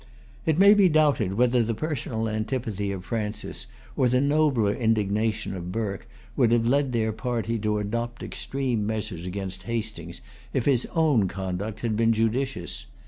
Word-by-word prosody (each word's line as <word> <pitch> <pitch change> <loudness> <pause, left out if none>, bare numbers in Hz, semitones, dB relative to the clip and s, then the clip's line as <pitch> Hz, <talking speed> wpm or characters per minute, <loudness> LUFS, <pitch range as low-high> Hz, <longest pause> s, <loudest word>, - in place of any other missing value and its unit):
It 160 -1 +3
may 200 +2 +8
be 200 -3 +5
doubted 145 - +2
whether 125 +1 +3
the 115 0 0
personal 115 -5 -2
antipathy 110 -2 -2
of 95 -2 -6
Francis, 110 -2 -4 0.3
or 130 - +3
the 125 +1 +3
nobler 140 -7 +2
indignation 110 -2 0
of 90 -1 -5
Burke, 105 +1 -3 0.3
would 120 -5 +3
have 115 -1 +3
led 135 +2 +2
their 110 -2 0
party 115 0 -2
to 105 0 0
adopt 115 +3 -3
extreme 130 -5 -2
measures 105 -5 -3
against 95 0 -4
Hastings, 105 -7 -3 0.3
if 130 - 0
his 130 -4 +2
own 150 - +3
conduct 95 +4 -4
had 115 -3 0
been 115 +1 +3
judicious. 115 -3 -1
115 Hz, 155 wpm, -26 LUFS, 105-125 Hz, 0.3 s, may